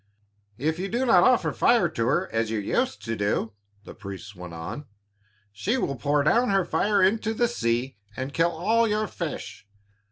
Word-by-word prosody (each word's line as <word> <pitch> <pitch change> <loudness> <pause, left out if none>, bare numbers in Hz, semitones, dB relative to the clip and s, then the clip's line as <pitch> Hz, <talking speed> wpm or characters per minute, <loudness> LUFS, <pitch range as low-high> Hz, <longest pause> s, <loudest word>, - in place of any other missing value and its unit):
"If 160 +5 -1
you 195 +2 -3
do 240 +5 0
not 190 -8 +6
offer 255 -2 +3
fire 240 -1 +3
to 115 0 -2
her, 175 +9 +1
as 115 -1 0
you 110 - -1
used 245 - -1
to 115 0 -2
do," 105 +1 -1 0.3
the - - -10
priests 100 0 -9
went 90 -1 -9
on, 110 - -7 0.6
"she 210 - -1
will 140 - -1
pour 145 +4 +1
down 235 - +3
her 195 -2 +2
fire 200 +2 +2
into 220 +3 +1
the 240 +2 +2
sea 120 - -1 0.2
and 130 +2 -4
kill 165 +2 +3
all 220 +8 +1
your 215 0 0
fish. 160 - -6
160 Hz, 185 wpm, -25 LUFS, -, 0.6 s, not